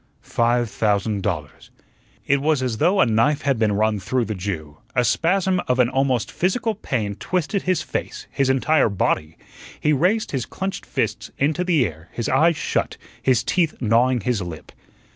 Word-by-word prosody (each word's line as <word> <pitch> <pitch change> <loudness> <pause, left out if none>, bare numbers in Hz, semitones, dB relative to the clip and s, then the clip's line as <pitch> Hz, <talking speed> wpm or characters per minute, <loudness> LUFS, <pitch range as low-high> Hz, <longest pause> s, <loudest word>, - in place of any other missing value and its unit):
"Five 120 0 +1
thousand 105 -1 0
dollars." 80 -8 -4 0.6
It 140 0 +2
was 150 -2 +1
as 120 -4 -1
though 190 +3 +3
a - - +6
knife 115 +6 +2
had 140 -4 +1
been 110 -2 +2
run 105 +1 +1
through 120 +6 -1
the 110 - -3
Jew; 85 -7 -5 0.2
a 125 -1 +3
spasm 185 - +2
of 125 - +1
an 125 -2 +4
almost 130 -4 0
physical 220 +5 0
pain 115 - -2
twisted 180 - -2
his 185 -1 0
face - - -5
his 135 -1 +1
entire 135 0 +3
body. 80 -5 -1 0.4
He 150 - +2
raised 185 +10 +1
his 130 -4 -2
clenched 190 0 -5
fists - - -2
into 155 +5 +1
the 165 -8 +2
air, 80 -2 -8
his 115 - -3
eyes 155 +4 +3
shut, - - -1 0.2
his 125 -4 +2
teeth 160 +6 +1
gnawing 120 +2 +2
his 115 -1 -1
lip. 85 -4 -8
125 Hz, 175 wpm, -22 LUFS, 105-155 Hz, 0.6 s, a